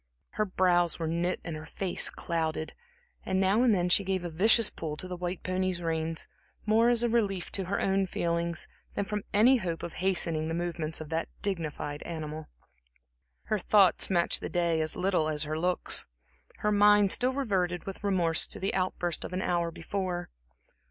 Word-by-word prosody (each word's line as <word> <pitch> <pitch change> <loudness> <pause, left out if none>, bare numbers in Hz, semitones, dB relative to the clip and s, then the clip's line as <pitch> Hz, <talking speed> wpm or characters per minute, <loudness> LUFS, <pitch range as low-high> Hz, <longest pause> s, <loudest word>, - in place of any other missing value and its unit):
Her 215 - -1
brows 175 -3 +2
were 165 - -3
knit 170 +3 -1
and 165 - -5
her 155 +1 -8
face 190 -3 0
clouded, 160 -2 -3 0.5
and 190 0 -1
now 195 +4 +3
and 250 -2 +4
then 180 -4 +2
she 180 +3 +4
gave 190 -1 -1
a 175 - -4
vicious 215 +6 +4
pull 155 -2 -5
to 185 - -5
the 180 - -5
white 180 0 -5
pony's 185 -1 -1
reins 160 -1 -2 0.4
more 225 +2 +4
as 240 -1 +2
a - - +3
relief 205 -6 0
to 195 - -1
her 200 +3 -2
own 195 0 +1
feelings 170 -1 -2 0.3
than 200 - -1
from 210 +1 -3
any 235 +6 +5
hope 175 -7 -4
of 170 - -5
hastening 170 -4 +1
the 165 - -2
movements 165 -2 -3
of 155 - -8
that 165 0 -2
dignified 155 -6 -2
animal. 155 -2 -6 1.0
Her 215 - -1
thoughts 195 -1 +4
matched 175 -3 +3
the - - -4
day 170 -2 +1
as 155 0 -1
little 180 -4 +1
as 150 -1 -1
her 155 +1 -3
looks. 180 +2 +1 0.5
Her 210 - +1
mind 205 -1 +5
still 255 +1 +4
reverted 185 -10 -1
with 195 +1 -7
remorse 175 -5 +2
to - - -6
the 195 - -2
outburst 180 -2 -1
of - - -7
an 185 - -2
hour 170 -1 0
before. 175 +1 -4
180 Hz, 185 wpm, -29 LUFS, 165-195 Hz, 1.0 s, any